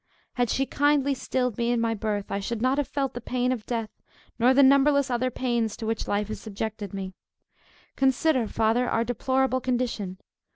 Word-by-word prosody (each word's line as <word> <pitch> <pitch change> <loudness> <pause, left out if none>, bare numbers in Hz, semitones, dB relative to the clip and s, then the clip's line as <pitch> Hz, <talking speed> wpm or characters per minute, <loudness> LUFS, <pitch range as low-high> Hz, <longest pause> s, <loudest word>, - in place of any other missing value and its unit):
Had 245 -2 0
she 270 - +1
kindly 285 0 +2
stilled 250 -3 -2
me 235 0 +1
in 240 - +1
my 230 0 +1
birth, 210 -2 -3
I 200 - -1
should 220 +3 -3
not 260 +4 +1
have 285 - 0
felt 275 -2 -2
the 245 - -6
pain 250 +2 -1
of 235 -4 -4
death, 230 -3 -2 0.5
nor 245 +2 +5
the 275 +2 +6
numberless 280 0 +4
other 250 +1 +1
pains 235 -3 -1
to 225 - -5
which 225 0 -2
life 205 0 -1
has 215 - -5
subjected 215 -1 -5
me. 190 -1 -5 0.8
Consider, 265 -1 +2
Father, 225 +4 +1
our 230 - +1
deplorable 260 +2 0
condition. 240 -7 -2
245 Hz, 190 wpm, -26 LUFS, 220-260 Hz, 0.8 s, the